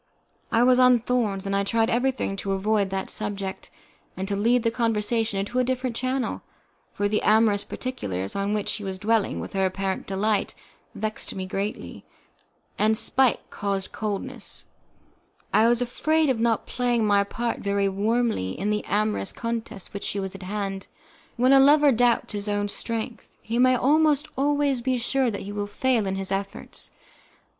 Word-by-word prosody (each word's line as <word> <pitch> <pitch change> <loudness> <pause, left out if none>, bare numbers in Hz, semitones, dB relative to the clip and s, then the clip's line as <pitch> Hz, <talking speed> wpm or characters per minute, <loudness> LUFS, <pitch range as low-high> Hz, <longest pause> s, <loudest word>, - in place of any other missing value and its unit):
I 230 +1 +4
was 250 0 +5
on 250 -2 +6
thorns, 215 -5 -1
and 195 0 -1
I 200 - +2
tried 225 +2 +1
everything 245 -4 0
to 195 0 -2
avoid 200 +1 +1
that 190 0 -3
subject, 200 -2 -5 0.5
and 190 +1 -3
to 200 - -1
lead 230 +4 +2
the 230 - +2
conversation 225 -2 0
into 205 +6 -1
a - - +3
different 255 -1 -2
channel, 255 +1 -2 0.5
for 205 - -1
the 210 +1 0
amorous 215 -2 +3
particulars, 95 - -4
on 200 +1 0
which 210 - -2
she 210 - -2
was 190 -1 -4
dwelling 220 +1 +1
with - - -7
apparent 190 0 -1
delight, 205 +2 0 0.4
vexed 215 0 -3
me 190 -1 -4
greatly, 195 +3 -4 0.8
and 215 +1 +3
spite 260 +1 +1
causing 200 -1 -3
coldness, 210 -2 -4 0.9
I 220 +2 +5
was 240 +1 +3
afraid 310 +5 +1
of 250 -4 +1
not 230 -1 +1
playing 240 -2 0
my 200 -1 +4
part 230 +4 -3
very 200 0 0
warmly 205 - 0
in 205 +3 -1
the 210 - -1
amorous 210 -1 0
contest 230 -5 -5
which 200 0 -3
was 190 -2 -3
at 195 - -9
hand. 195 0 -4 0.5
When 255 +3 +4
a 270 - +8
lover 290 +1 +6
doubts 240 -2 +2
his 205 0 -3
own 205 0 0
strength, 230 +3 -4
he 230 +2 -3
may 255 0 +5
almost 295 +3 +3
always 285 -1 +1
be 255 +1 0
sure 255 +2 +1
that 200 - -4
he 200 - -6
will 205 0 -3
fail 230 0 +1
in 190 - -1
his 195 0 -1
efforts. 195 0 -4
215 Hz, 170 wpm, -25 LUFS, 200-245 Hz, 0.9 s, a